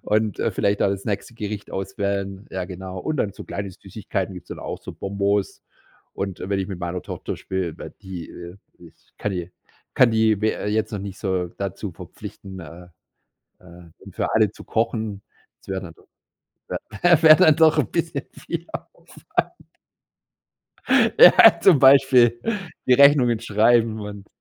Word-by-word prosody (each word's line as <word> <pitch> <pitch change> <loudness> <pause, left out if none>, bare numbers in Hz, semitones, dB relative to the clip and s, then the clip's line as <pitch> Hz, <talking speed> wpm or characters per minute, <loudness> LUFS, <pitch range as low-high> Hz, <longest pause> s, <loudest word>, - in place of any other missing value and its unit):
Und, 105 -1 0
äh, - - +1
vielleicht 100 0 0
auch - - +3
das 100 0 -3
nächste 105 +2 -4
Gericht 105 -2 -6
auswählen, 100 +1 -4
ja 95 -1 -4
genau. 95 0 -8
Und 155 +9 -3
dann 100 - -1
so - - -10
kleine 100 -1 -5
Süßigkeiten 95 0 -5
gibt's 90 -1 -11
dann - - -7
auch, - - -6
so - - -8
Bonbons. 100 0 -2 0.5
Und 95 -2 -5
wenn 100 +1 -2
ich 95 - -2
mit 95 -3 -6
meiner 85 +1 -4
Tochter - - -6
spiele, 95 -4 -4
weil - - -8
die, 90 -4 -8
äh, 85 +2 -10 0.6
kann 105 - -2
i 90 -1 -5 0.4
kann 125 -2 +5
die, 110 -2 +2
we 110 0 +1
äh, - - -6
jetzt 110 +1 -1
noch 105 - -3
nicht 100 0 -7
so, 95 -3 -2
dazu 100 +1 -6
verpflichten, 95 -1 -10
äh, 85 +2 -11 0.7
äh, 85 -2 -15 0.2
für - - -2
alle 110 -2 +3
zu - - -14
kochen, 110 -3 -2 0.4
das - - -23
wäre 95 0 -3
dann 85 -3 -10
doch - - -25 1.1
wäre 155 -1 +9
dann 160 -5 +5
doch, 160 0 +4
ein 130 - +1
bisschen 165 -4 -2
viel 170 0 -6
Aufwand. - - -9 2.2
Ja, - - +8
zum 170 -8 +6
Beispiel 130 -3 +5 0.5
die 130 - +5
Rechnungen 130 -4 +5
schreiben 110 0 +2
und 105 -1 -8
100 Hz, 160 wpm, -22 LUFS, 95-115 Hz, 2.2 s, wäre